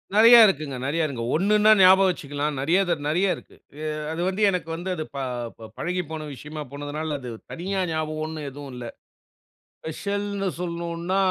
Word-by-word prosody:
நெறைய 230 +3 +9
இருக்குங்க. 150 -6 -2
நெறைய 160 +3 +1
இருக்கு. 120 -5 -5
ஒண்ணுன்னா 210 +4 +4
ஞாபகம் 190 +1 +7
வச்சுக்கலாம். 145 -3 -3
நெறைய 170 +7 +3
தர 165 -3 +1
நெறைய 180 +5 +2
இருக்கு. - - -15 0.3
அ 155 - -3 0.2
அது 165 +2 -3
வந்து 190 +3 -2
எனக்கு 180 -3 -2
வந்து 175 +3 -5
அது 155 - -3
ப - - -4 0.6
பழகி 180 +1 -2
போன 155 -1 -5
விஷயமா 150 +3 -8
போனதனால, 145 +1 -4
அது 125 -2 -7 0.2
தனியா 190 +3 -2
ஞாபகம் 155 0 -2
ஒண்ணு 155 -2 -6
எதுவும் 140 -2 -9
இல்ல. 120 -1 -6 1.0
ஸ்பெஷல்ன்னு 200 +3 -3
சொல்லணும்ன்னா 170 +1 -3
165 Hz, 160 wpm, -24 LUFS, 150-190 Hz, 1.0 s, நெறைய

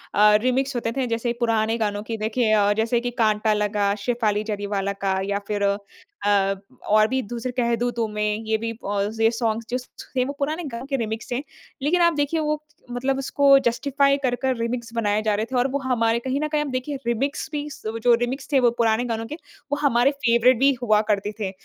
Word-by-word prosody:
अ, 210 +1 +6
remix 260 +2 0
होते 230 -1 -1
थे 260 -2 0
जैसे 230 +1 -1
पुराने 225 -1 +1
गानों 205 -2 -1
की 225 +1 -4
देखिए 220 +1 0
अ 205 -1 +4
जैसे 225 +2 +2
कि 245 +1 -3
काँटा 215 0 +2
लगा, 210 -1 +1
शेफाली 210 -1 0
जरीवाला 200 -2 -2
का 190 -1 +1
या 200 0 0
फ़िर 205 -1 -1
अ 200 0 +2 0.5
अ, 195 -1 +3 0.3
और 215 +1 +5
भी 260 +3 0
दूसरे 240 +2 -5
कह 235 -1 +2
दूँ 245 0 0
तुम्हें 210 -1 -1
ये 220 0 +1
भी 230 +1 -3 0.2
ऑल 205 0 0
ये 225 - +6
सॉन्ग्स 230 -1 -1
जो 250 - 0 0.4
थे 255 - +3
वो 280 - -4
पुराने 305 +5 -1
गाने 250 -4 -6
के 275 - 0
रीमिक्स 220 -1 -4
हैं। 245 - -1 0.4
लेकिन 330 +6 +2
आप 340 0 +5
देखिए 290 +2 0
वो 305 -1 0 0.3
मतलब 260 +2 -1
उसको 275 +1 +4
जस्टिफ़ाई 275 +3 +2
कर, 245 -2 +1
कर 260 +1 -1
रीमिक्स 230 0 -3
बनाया 215 -2 +1
जा 215 -1 +1
रहे 215 +2 -1
थे - - -2
और 245 +2 +3
वो 280 - 0
हमारे 235 -3 +1
कहीं 260 +3 -2
ना 305 - 0
कहीं 300 0 0
हम 295 -2 -3
देखिए 255 +3 -3
रीमिक्स 270 +5 -1
भी 295 -1 -3 0.4
जो 245 - +6
रीमिक्स 265 +4 -3
थे। 275 - +6
वो 245 -2 +4
पुराने 230 +1 +2
गानों 225 -1 -3
के 300 - -6 0.4
वो 290 - +1
हमारे 270 -2 +3
फ़ेवरेट 245 -2 +3
भी 275 +1 +5
हुआ 215 -3 +3
करते 205 0 0
थे। 195 -3 -2
235 Hz, 215 wpm, -23 LUFS, 215-265 Hz, 0.5 s, अ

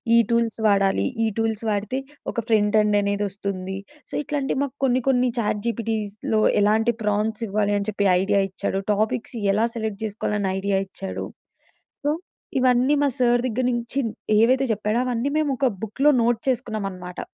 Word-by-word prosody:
ఈ - - +7
టూల్స్ 235 -1 +1
వాడాలి, 195 -2 +3 0.2
ఈ - - +3
టూల్స్ 225 -1 -1
వాడితే 210 +4 -1 0.3
ఒక 235 - -2
ఫ్రంట్ 215 -2 +3
ఎండ్ 210 -1 +2
అనేదొస్తుంది. 200 -2 -3 0.3
సో, - - -15
ఇట్లాంటివి 280 -2 -2
మాకు 280 -1 -5
కొన్ని, 255 -1 +3
కొన్ని 250 -1 +3
చాట్‌జీపీటీస్‌లో 220 -1 -1 0.2
ఎలాంటి 220 +3 +3
ప్రాంప్ట్స్ 210 +1 0
ఇవ్వాలి 205 0 0
అని 200 - -3
చెప్పి 200 -1 +1
ఐడియా 200 +1 +2
ఇచ్చాడు, 190 +1 -2
టాపిక్స్ 215 +4 -1 0.2
ఎలా 215 +3 +2
సెలెక్ట్ 220 -2 -3
జేసుకోవాలని 210 -2 -1
ఐడియా 195 0 +1
ఇచ్చాడు. 190 0 -5 0.8
సో, 290 - +1 0.5
ఇవన్నీ 255 +2 +3
మా 285 - +3
సార్ 245 -1 +3
దెగ్గర 250 +1 -1
నుంచి 240 +3 -2 0.4
ఏవైతే 260 +4 +4
చెప్పాడో 215 +2 -1
అవన్నీ 250 +2 -1
మేమోక 280 -3 +1
బుక్‌లో 270 +8 +3
నోట్ 235 0 +2
చేసుకున్నామనమాట. 200 -8 -3
220 Hz, 145 wpm, -23 LUFS, 205-245 Hz, 0.8 s, ఈ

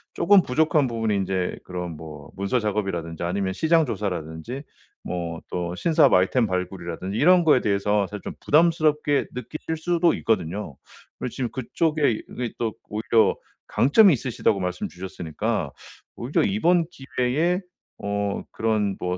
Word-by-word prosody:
쪼금 200 +1 +5
부족한 150 +1 +2
부분이 110 -3 -1
인제 95 -2 -1
그런 90 -2 -5
뭐 75 -2 -10
문서 100 +6 0
작업이라든지 95 -6 -2
아니면 95 +2 -1
시장 160 - +3
조사라든지 100 - -4 0.4
뭐 85 -2 -4
또 90 0 -3
신사업 155 - +4
아이템 105 +6 +3
발굴이라든지 90 +1 -4
이런 175 +5 +5
거에 150 -5 +5
대해서 100 0 +1
사실 105 0 -7
좀 - - -5
부담스럽게 155 -2 +3
느끼실 155 +5 -5
수도 170 +1 +2
있거든요. 95 -6 -2 0.4
그리고 - - -3
지금 125 -3 -3
그쪽에 145 +3 0 0.2
이게 125 -2 -4
또 115 -2 -1 0.2
오히려 110 +1 +2 0.3
강점이 185 - +5
있으시다고 115 -5 0
말씀 90 -1 -3
주셨으니까 90 -3 -3 0.4
오히려 125 +5 0
이번 180 -4 +2
기회에 135 +5 0 0.4
어 100 0 -1
그런 110 -3 0
뭐 90 0 -2
110 Hz, 345 characters per minute, -24 LUFS, 95-150 Hz, 0.4 s, 쪼금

